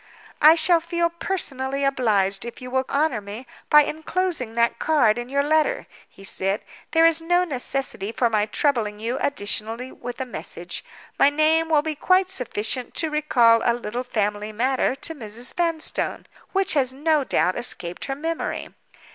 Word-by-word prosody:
"I 310 +2 +8
shall 335 +1 +4
feel 340 0 -1
personally 275 -7 -2
obliged 210 -8 +1
if 235 +4 -7
you 250 -1 -8
will 260 0 +1
honor 280 -6 +1
me 205 +5 -8 0.2
by 300 0 +8
inclosing 315 -6 -2
that 235 0 +1
card 240 -8 +3
in 240 +1 -6
your 280 +1 +1
letter," 315 +12 +1 0.2
he 195 - -16
said. 195 +1 -1 0.3
"There 325 0 +4
is 330 0 +4
no 350 +2 +2
necessity 265 - -2
for 240 +1 +1
my 215 -2 +1
troubling 220 -4 0
you 235 +5 -2
additionally 225 0 -2
with 245 0 -8
a 260 - -2
message. 250 - -4 0.4
My 275 - +7
name 315 +2 +2
will 300 -2 +3
be 315 0 -2
quite 370 +5 +2
sufficient 245 - -2
to 320 -2 0
recall 240 -7 +4
a 235 - +2
little 240 +1 -4
family 210 -3 -2
matter 255 +4 0
to 325 - -7
Mrs. 235 -3 -7
Vanstone, 335 -2 -2 0.3
which 390 -1 +1
has 265 -4 +1
no 300 +2 +1
doubt 185 -7 +1
escaped 180 -7 -4
her 270 - -3
memory. 325 +3 -3
265 Hz, 165 wpm, -23 LUFS, 230-315 Hz, 0.4 s, I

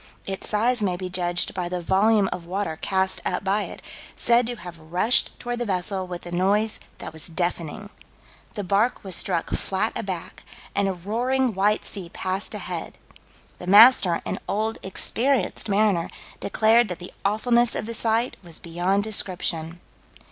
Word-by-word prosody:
Its 195 0 -3
size 230 +3 +2
may 185 -3 0
be 185 0 -5
judged 175 -1 +1
by 180 -3 -3
the 180 0 -2
volume 200 +4 +3
of 170 -2 -8
water 190 -2 -2
cast 190 -1 +2
up 180 - -1
by 200 +2 +1
it, - - -10 0.3
said 235 0 +3
to 245 - -3
have 175 -5 -10
rushed 180 +9 +1
toward 240 0 -4
the - - 0
vessel 190 -1 -1
with 175 -1 -7
a 175 - -7
noise 200 +5 +2 0.2
that - - -8
was 160 -2 -7
"deafening." 175 +4 -3 0.6
The 205 - -3
bark 200 +6 +1
was 190 -2 -4
struck 175 -2 0
flat 195 +4 -1
aback, 185 -4 -5 0.3
and 200 0 +1
"a 195 - 0
roaring, 240 +7 0
white 205 +2 +2
sea 185 -5 -3
passed 190 +2 -3
ahead." - - -5 0.6
"The 180 - -8
master, 205 -3 +7
an - - -3
old, 220 +2 -1
experienced 225 +4 0
mariner, 200 -4 +2 0.3
declared 225 +3 +3
that 180 - -5
the 180 0 -10
awfulness 235 +3 +2
of - - -2
the 230 - -5
sight 230 +2 0
was 170 -3 -7
beyond 180 +4 0
description." 175 -5 -2
195 Hz, 165 wpm, -24 LUFS, 180-220 Hz, 0.6 s, master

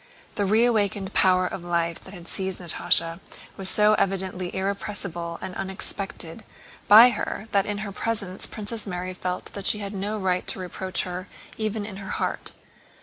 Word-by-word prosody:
The 205 -1 0
reawakened 210 -3 +2
power 185 -1 +4
of 180 - -4
life 170 -1 -1
that 190 - -11
had 175 -2 -11
seized 190 0 +1
Natásha 165 -1 +2 0.4
was 190 -1 +1
so 210 0 +5
evidently 185 -2 -1
irrepressible 190 -3 -2
and 185 - -5
unexpected 190 0 -3 0.4
by 225 +4 +10
her 215 - -4
that 200 -1 +2
in 205 -1 -1
her 200 - -5
presence 200 -3 -2
Princess 215 0 -3
Mary 180 0 -3
felt 180 0 -4
that 200 -1 -3
she - - +4
had 200 -1 -5
no 205 +2 -2
right 185 -2 0
to - - -1
reproach 185 +1 -2
her 180 +1 -5 0.3
even 215 -1 -1
in 205 -2 -7
her 195 0 -7
heart. - - -2
190 Hz, 165 wpm, -25 LUFS, 180-205 Hz, 0.4 s, by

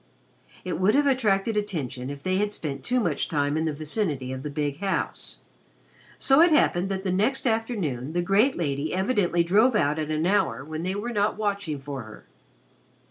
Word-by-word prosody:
It 180 - -3
would 195 +5 +3
have 290 +1 +4
attracted 225 -6 +2
attention 150 - -3
if 140 0 -8
they 185 0 0
had 205 +1 0
spent 140 -8 -5
too 250 - +1
much 175 -10 0
time 145 -1 0
in 160 +1 0
the 160 - 0
vicinity 150 - -2
of 130 0 -5
the 150 - -5
big 145 -1 -3
house. 195 -1 -3 0.8
So 270 +3 +4
it 345 - +7
happened 195 - +2
that 190 -1 -3
the 190 - -1
next 215 +10 0
afternoon 200 - -1
the 175 0 0
great 205 +9 +3
lady 145 0 -2
evidently 190 -4 +1
drove 215 +8 +3
out 150 -5 +1
at 155 -1 -3
an 155 +1 0
hour 185 -8 +1
when 155 +1 -5
they 185 +3 -2
were 235 +4 -4
not 205 0 +1
watching 200 -8 -2
for 135 -1 -6
her. 110 -2 -12
180 Hz, 190 wpm, -25 LUFS, 150-210 Hz, 0.8 s, it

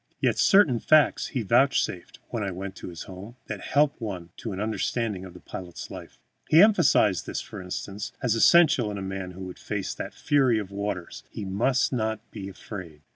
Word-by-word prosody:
Yet - - +1
certain 190 - +5
facts 155 +3 +4
he 125 -4 -3
vouchsafed, 115 -5 +1
when 115 - -3
I 100 - -1
went 95 +1 -6
to - - -8
his 85 -3 -7
home, 100 +5 -10
that 105 -3 -6
help 145 +3 +1
one 90 -6 -5
to 115 - -5
an 95 - -5
understanding 110 -2 -2
of 90 - -12
the - - -10
pilot's 90 -2 -8
life. - - -10 0.3
He 160 - +7
emphasized 170 - +4
this, - - -3
for - - -8
instance, 100 +3 -5
as 125 -4 +1
essential 130 -1 +5
in 105 - -4
a 100 - -4
man 95 -1 -5
who 95 - -10
would 90 - -9
face - - -3
that - - -7
fury 135 -6 +3
of 100 -3 -4
waters, 100 -3 -4
he 105 - -6
must 120 +9 +1
not 110 -2 -2
be 100 -3 -7
afraid. 90 -5 -9
105 Hz, 195 wpm, -26 LUFS, 95-125 Hz, 0.3 s, He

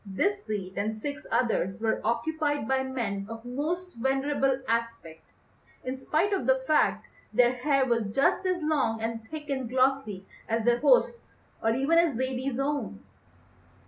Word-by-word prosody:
This 395 - -1
seat 195 -3 -3
and 215 +2 -1
six 290 +6 -6
others 195 -6 0
were 220 0 0
occupied 290 +2 0
by 265 0 +2
men 225 -7 -3
of 225 +1 -8
most 325 +9 -3
venerable 270 0 +1
aspect, 230 -9 -2 0.6
in 255 +1 -3
spite 315 +9 0
of 260 -11 -1
the 260 - +6
fact 305 +2 +2 0.3
their 245 -1 +4
hair 275 +1 +2
was 235 -3 +1
just 270 - +2
as 360 -3 0
long 275 -8 +1
and 225 0 -3
thick 305 -1 -7
and 265 -4 -2
glossy 255 -6 +1 0.2
as 225 0 0
their 240 0 +3
host's 475 - +2 0.2
or 225 0 +2
even 290 +6 +3
as 335 -6 +2
Zaidie's 260 0 -2
own. 275 - -2
260 Hz, 155 wpm, -28 LUFS, 225-290 Hz, 0.6 s, the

